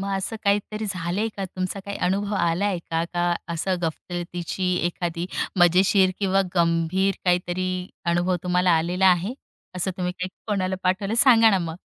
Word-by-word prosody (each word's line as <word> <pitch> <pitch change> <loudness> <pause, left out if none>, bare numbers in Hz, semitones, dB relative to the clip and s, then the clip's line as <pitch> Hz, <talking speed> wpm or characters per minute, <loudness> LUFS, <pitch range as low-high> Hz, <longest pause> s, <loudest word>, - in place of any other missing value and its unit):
मग 195 - -3
असं 195 +4 -3
काहीतरी 205 +1 0
झालंय 185 +3 -1
का? 195 - -3
तुमचा 185 +1 -4
काय 200 0 -5
अनुभव 200 +2 -1
आलाय 180 +2 +1
का? 165 0 0
का 175 0 -1 0.2
असं 185 +3 -1
गफलतीची 175 +2 -3
एखादी 175 0 -3 0.3
मजेशीर 185 +2 +5
किंवा 195 -1 +2
गंभीर 170 +3 +1
काहीतरी 180 +1 0 0.4
अनुभव 175 +1 +1
तुम्हाला 180 0 +2
आलेला 180 +4 +1
आहे? 185 +6 +3 0.4
असं 180 +1 0
तुम्ही 180 -1 -2
काय 185 - -3 0.2
कोणाला 190 -3 -1
पाठवलं? 190 +3 0
सांगा 235 -4 +7
ना 195 - +3
मग? 165 -2 -4
185 Hz, 150 wpm, -24 LUFS, 175-195 Hz, 0.4 s, सांगा